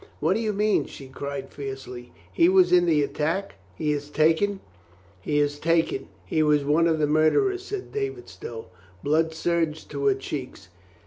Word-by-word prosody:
"What 160 +5 +2
do 215 - -1
you 220 -2 0
mean?" 210 +1 +1
she 135 - -10
cried 135 +1 -6
fiercely. 135 -3 -7 0.2
"He 165 - +5
was 185 -2 +5
in 175 -1 +5
the 155 -3 +3
attack? 160 - -2 0.2
He 150 +9 -1
is 145 0 -3
taken 165 +7 +2 0.3
?" 90 +1 -29
"He 145 +9 -1
is 145 0 +1
taken. 165 -4 +1 0.2
He 155 +12 0
was 150 -1 +3
of 160 +3 +3
the 155 - +2
murderers," 155 - +2
said 400 -1 -6
David 405 -3 -4
Stow. 115 -1 -8 0.4
Blood 160 +2 +2
surged 160 -1 -1
to 140 -1 -3
her 135 - +4
cheeks. 130 - -7
155 Hz, 175 wpm, -25 LUFS, 140-175 Hz, 0.4 s, He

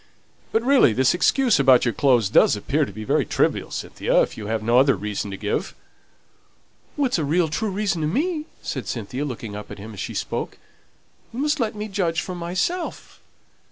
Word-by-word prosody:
But, 225 - +1
really, 260 - +5
this 130 +3 +3
excuse 235 - +3
about 130 -2 +5
your 120 - +1
clothes 125 -7 +3
does - - +5
appear 140 +9 0
to - - -9
be 110 - -7
very - - +1
trivial, - - 0
Cynthia, - - 0
if - - -5
you 105 - -7
have 110 0 -2
no 120 +3 +4
other 135 +1 +4
reason 105 -1 -4
to 95 - -6
give." 105 +1 -3 1.2
"It 275 -4 +1
is 185 - +1
a - - 0
real, 160 +4 +2
true 215 +8 -2
reason 195 -3 -1
to 150 - 0
me," 305 - -1 0.2
said - - -4
Cynthia, 120 +4 -4
looking 115 -6 -6
up 105 0 -8
at - - -8
him 110 +2 -9
as 100 - -10
she - - -5
spoke. - - -3 0.7
"You 235 - -7
must 300 +1 0
let 225 -3 -1
me 210 +1 -4
judge 185 -5 -1
for 185 - -6
myself. 185 - -3
150 Hz, 200 wpm, -23 LUFS, -, 1.2 s, really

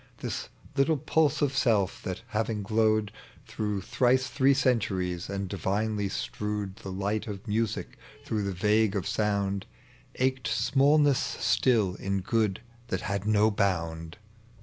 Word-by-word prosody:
Tins - - -4 0.3
little 145 +3 +3
pulse 155 +1 +1
of 140 -1 0
self, 110 -7 +2
that, 95 -1 -5
having 110 -1 -1
glowed 110 0 +2 0.3
Through 105 -2 -3
thrice 125 +5 +2
three 135 0 +3
centuries, 95 -9 0
and 100 -1 -3
divinely 100 +2 -1
strewed 105 -1 -4
The 95 - -7
light 100 +4 -2
of 105 +1 -7
music 110 +1 -2 0.3
through 110 -2 -1
the 100 -1 -1
vague 105 +2 +2
of 95 - -1
sound, 100 -2 0 0.5
Ached 130 0 0
smallnesB 140 +5 +2
still 110 -8 +3
in 95 +1 -2
good 105 -1 0 0.3
that - - -2
had 100 +1 -3
no 110 0 +4
bound. 85 -4 -1
105 Hz, 135 wpm, -28 LUFS, 100-120 Hz, 0.5 s, no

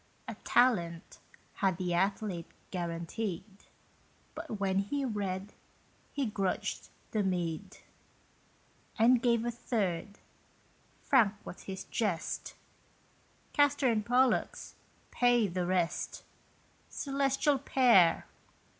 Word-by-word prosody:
A - - -4
Talent 175 -10 +2 0.4
had 190 -5 +1
the 180 -1 -1
athlete 190 -1 -1 0.2
guaranteed, 175 +2 -3 0.9
But 310 -10 -6
when 195 -1 +1
he 275 +8 -1
read 200 -3 -3 0.6
he 280 -2 -1
grudged 200 -4 -2 0.2
the 215 - +1
meed, 180 0 -2 1.2
And 235 +2 +5
gave 235 -1 +2
a 240 - 0
third: 205 -5 -2 0.9
frank 225 -8 +4
was - - -9
his 190 -1 -5
jest, 195 -8 -2 1.0
"Castor 285 -3 +3
and 215 -2 0
Pollux 250 +3 +1 0.4
pay 245 -3 +3
the 180 -1 -2
rest; 180 -2 -1 0.7
Celestial 275 0 +1
pair! 240 -11 +4
205 Hz, 95 wpm, -31 LUFS, 185-245 Hz, 1.2 s, And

